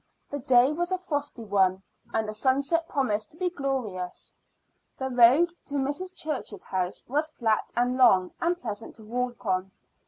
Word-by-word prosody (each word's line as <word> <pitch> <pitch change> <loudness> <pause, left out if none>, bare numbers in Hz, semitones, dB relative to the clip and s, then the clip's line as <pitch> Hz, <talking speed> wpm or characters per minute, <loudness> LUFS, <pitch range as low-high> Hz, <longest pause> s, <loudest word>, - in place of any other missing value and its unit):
The 285 - -3
day 255 0 +5
was 350 +4 -2
a 370 - +2
frosty 290 -8 -4
one, 190 -2 +2 0.3
and 220 -1 0
the 215 - -4
sunset 280 +8 +1
promised 220 -7 0
to 315 - -17
be 360 0 0
glorious. 250 - -4 0.6
The 265 0 -3
road 255 +8 +6
to 285 - -6
Mrs. 290 +7 -1
Church's 280 -9 -4
house 185 -1 -3
was 300 +5 0
flat 225 -7 0
and 245 +1 +2
long 190 -8 +5
and 345 +1 +1
pleasant 225 -6 -6
to 220 - -12
walk 245 +2 -3
on. 185 -1 0
255 Hz, 165 wpm, -27 LUFS, 215-290 Hz, 0.6 s, road